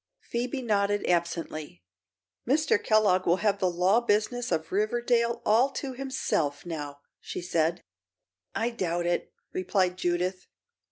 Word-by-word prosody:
Phoebe 250 +3 -3
nodded, 205 -2 +1
absently. 165 - -2 0.6
"Mr. 285 -3 +2
Kellogg 205 -4 +3
will 170 - +5
have 200 0 +1
the 185 - +2
law 180 +5 +3
business 235 +2 0
of 160 0 -1
Riverdale 235 +3 +1
all 235 +6 +4
to 270 -2 -4
himself, 245 - -2
now," 145 -4 -6 0.2
she - - -6
said. 170 0 0 0.7
"I 235 +2 0
doubt 175 -6 -1
it," 175 0 -1 0.2
replied 185 -1 +1
Judith. 180 +1 -1
195 Hz, 125 wpm, -28 LUFS, 175-235 Hz, 0.7 s, will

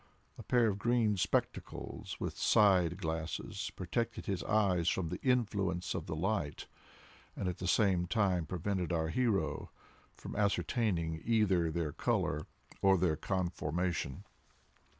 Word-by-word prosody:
A - - -9
pair 120 -2 +3
of 100 -2 -1
green 115 -2 +2
spectacles, 95 - -2
with - - -3
side 90 -5 +4
glasses, 80 -2 -3
protected 95 +6 -2
his 95 -3 -1
eyes 95 -6 +2
from 85 -4 -1
the 90 - -5
influence 100 -8 0
of 85 -4 -4
the 80 - -3
light, 85 -4 -1 0.7
and 95 - -3
at 90 0 -3
the 90 - -3
same 95 -3 +3
time 90 -5 +1
prevented 90 +1 -2
our 80 -2 0
hero 95 - 0 0.5
from - - -8
ascertaining 100 - 0
either 100 -7 +2
their 80 -2 -2
color 75 +2 -1 0.3
or 95 -1 +5
their 85 -3 +2
conformation. 85 -4 -2
90 Hz, 130 wpm, -33 LUFS, 85-105 Hz, 0.7 s, or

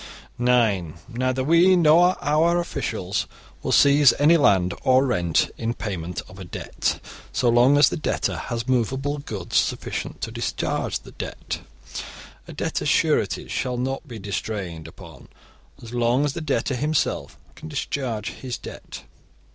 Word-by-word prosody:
(9) 115 -10 +2
Neither 130 +1 -1
we 170 +6 +5
nor 175 +2 +5
our 160 +4 +3
officials 175 - -2 0.3
will - - -2
seize 140 -3 +6
any 150 +4 +5
land 95 - +3
or 130 +1 +4
rent 85 - +1
in 115 +1 -2
payment 90 -4 -4
of 95 - -13
a - - -6
debt, 85 - -3 0.3
so 125 - 0
long 120 +4 +5
as 145 - +6
the - - -3
debtor 155 - -1
has 120 0 -4
movable 130 +4 0
goods 105 -10 -3
sufficient - - -2
to - - -3
discharge - - -2
the - - -13
debt. - - -6 0.9
A - - -9
debtor's - - -2
sureties - - +1
shall 125 -1 -2
not 135 +4 -3
be 120 -4 -8
distrained 95 -5 -4
upon 85 -4 -13 0.5
so 120 +1 -9
long 120 +4 +2
as 145 - -1
the 170 - -5
debtor 140 -4 -1
himself 150 +4 -1 0.2
can 155 - -10
discharge 125 -7 -3
his 125 -2 -6
debt. - - -10
125 Hz, 145 wpm, -23 LUFS, 105-145 Hz, 0.9 s, seize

